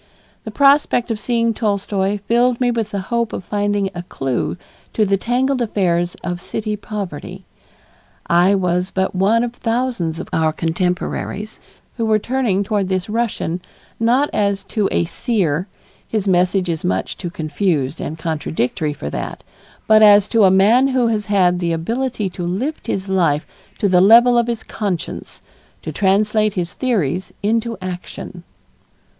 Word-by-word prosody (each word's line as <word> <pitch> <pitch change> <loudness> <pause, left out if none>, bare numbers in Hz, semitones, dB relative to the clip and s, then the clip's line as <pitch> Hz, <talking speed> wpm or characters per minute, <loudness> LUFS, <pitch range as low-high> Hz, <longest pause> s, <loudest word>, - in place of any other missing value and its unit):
The - - -4
prospect 275 -4 +3
of 220 - -2
seeing 230 0 +1
Tolstoy 200 -2 -1
filled 240 +1 +2
me 245 -1 +2
with 225 -3 -2
the 200 -2 -3
hope 235 -2 0
of - - -4
finding 205 0 -1
a 175 - -5
clue 135 -7 -3 0.4
to 215 - +2
the 200 0 +2
tangled 250 +5 0
affairs 175 -6 0
of 175 0 -3
city 215 +2 -3
poverty. 200 -7 -7 0.8
I 175 +4 +4
was 180 -1 0
but 190 0 -1
one 205 +5 +2
of 240 -1 -3
thousands 230 -9 -1
of - - -6
our 160 -1 +2
contemporaries 180 +5 -2 0.4
who 230 - 0
were 215 -1 +4
turning 225 -4 0
toward 200 -2 -1
this 185 +1 -1
Russian, 210 -6 -2 0.4
not 245 +6 +2
as 200 -1 0
to 210 -3 +1
a - - +1
seer 180 - -1 0.4
his 210 -3 -2
message 180 0 +2
is 165 -2 -2
much 95 +1 -1
too 175 - -5
confused 160 -3 -1
and 155 - -5
contradictory 155 -2 -2
for 75 - -6
that - - -5 0.4
but 215 0 +6
as 205 -1 +7
to 225 -3 +4
a - - +6
man 210 +8 +5
who 255 -3 +2
has 215 -2 -1
had 180 -3 +3
the 170 -2 0
ability 230 +6 -2
to 175 - -6
lift 225 - -3
his 195 0 -2
life 170 -6 +1 0.3
to 205 - +1
the 180 -2 +4
level 235 +5 +7
of 235 -1 +3
his 235 -2 -3
conscience, 190 -6 -5 0.4
to - - -4
translate 210 +2 +2
his 175 -2 -2
theories 190 - -1
into 225 +1 0
action. 180 -1 -7
200 Hz, 160 wpm, -19 LUFS, 180-230 Hz, 0.8 s, as